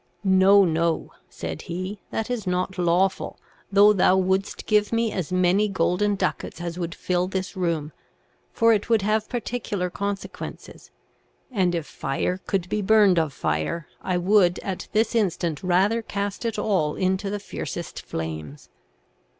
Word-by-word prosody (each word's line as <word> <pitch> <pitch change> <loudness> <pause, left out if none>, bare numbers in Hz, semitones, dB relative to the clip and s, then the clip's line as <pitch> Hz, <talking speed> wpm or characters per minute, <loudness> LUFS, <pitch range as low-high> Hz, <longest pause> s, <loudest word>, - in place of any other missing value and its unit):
'No, 195 +1 +6
no,' 165 0 0 0.2
said 80 -1 -6
he, 185 +4 -4
'that 225 +2 -3
is 225 -6 -3
not 180 +1 -1
lawful, 180 +2 +1 0.3
though 205 +1 +7
thou 190 -1 +4
wouldest 190 +1 0
give 210 -1 +2
me 230 -1 +1
as 185 -3 -3
many 185 +3 +3
golden 195 +2 +1
ducats 185 -3 -3
as 170 0 -5
would 170 -1 -3
fill 180 0 0
this 190 +1 -4
room; 165 -5 -1 0.6
for 230 0 +4
it 210 +1 -1
would 225 -4 +3
have 215 +1 0
particular 215 -6 -3
consequences, 200 +1 -6 0.6
and 185 -6 +1
if 165 -3 -2
fire 150 +8 -2
could 190 -3 -1
be 210 +3 -1
burned 205 -3 +5
of 160 -3 0
fire, 80 - -2
I 185 -1 -1
would 180 -1 +4
at 190 -2 -4
this 220 +1 +1
instant 175 -8 0
rather 190 +5 +2
cast 200 0 -4
it 225 -1 -1
all 160 -8 +1
into 190 +1 0
the 205 +1 -3
fiercest 200 - -6
flames.' 80 -3 -6
190 Hz, 150 wpm, -24 LUFS, 175-205 Hz, 0.6 s, though